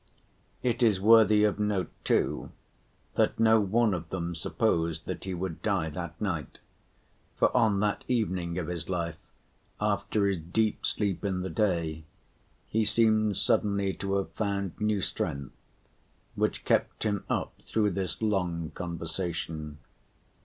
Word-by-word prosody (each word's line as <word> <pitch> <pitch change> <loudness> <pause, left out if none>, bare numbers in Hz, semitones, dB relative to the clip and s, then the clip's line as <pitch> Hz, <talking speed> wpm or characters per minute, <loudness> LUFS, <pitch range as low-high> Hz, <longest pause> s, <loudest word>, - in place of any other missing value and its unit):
It 125 0 0
is 110 -5 +4
worthy 110 0 +6
of 105 -1 +2
note, 105 -5 0
too, - - +1 0.6
that - - +1
no 110 0 +6
one 110 +2 +2
of 85 -2 -4
them 85 -2 -3
supposed 80 0 0
that - - -5
he 95 -1 -3
would 90 -2 -4
die 95 -7 0
that 85 +1 -6
night, 85 -9 -3 0.8
for - - +2
on 110 -5 +3
that 105 -1 0
evening 95 -8 0
of 90 - -1
his 85 -1 -4
life 85 -3 -2 0.6
after 105 -2 +1
his 100 -3 +1
deep 105 +7 0
sleep 100 -4 -1
in 95 -2 -1
the 95 -1 -4
day 80 -4 0 0.6
he 110 +1 +1
seemed 110 -1 +3
suddenly 100 -2 +1
to 100 +1 -2
have 100 -1 -1
found 100 -3 -1
new 105 -2 +1
strength, 70 -6 -3 0.8
which - - -1
kept - - +1
him 105 -3 0
up - - -1
through 105 -2 +1
this 95 0 -3
long 90 -6 0
conversation. 80 -3 -4
95 Hz, 140 wpm, -29 LUFS, 85-105 Hz, 0.8 s, worthy